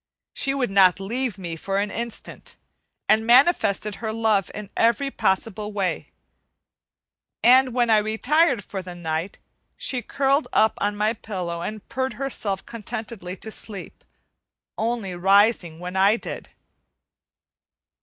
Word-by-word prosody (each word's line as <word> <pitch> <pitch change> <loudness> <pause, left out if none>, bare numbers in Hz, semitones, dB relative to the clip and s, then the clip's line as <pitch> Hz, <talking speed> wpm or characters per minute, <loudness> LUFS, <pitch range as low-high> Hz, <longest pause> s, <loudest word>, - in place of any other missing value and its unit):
She 275 -1 +1
would 250 -6 -1
not 190 -2 +5
leave 230 +3 -2
me 175 -3 -5
for 195 +4 -3
an 200 +1 -1
instant, 235 -1 -6 0.5
and 220 +1 +4
manifested 235 - +3
her 220 -1 -3
love 220 -3 +1
in 210 -1 -8
every 235 +5 +2
possible 210 0 -1
way; 195 -3 -2 1.3
and 255 +1 +6
when 240 -2 +2
I 220 - +6
retired 240 +4 +2
for 190 0 -6
the 180 -1 -9
night, 165 +1 -3 0.4
she 255 -2 -1
curled 275 +4 +1
up 220 0 +4
on 205 +1 0
my 215 +2 +1
pillow 180 -6 -5
and 215 +4 -6
purred 260 +2 -2
herself 215 -8 -3
contentedly 220 -4 -7
to 220 - -8
sleep, 205 -3 -7 0.7
only 220 -4 -2
rising 190 -2 +3
when 180 +1 -6
I 195 +3 +5
did. - - -7
215 Hz, 135 wpm, -23 LUFS, 195-235 Hz, 1.3 s, and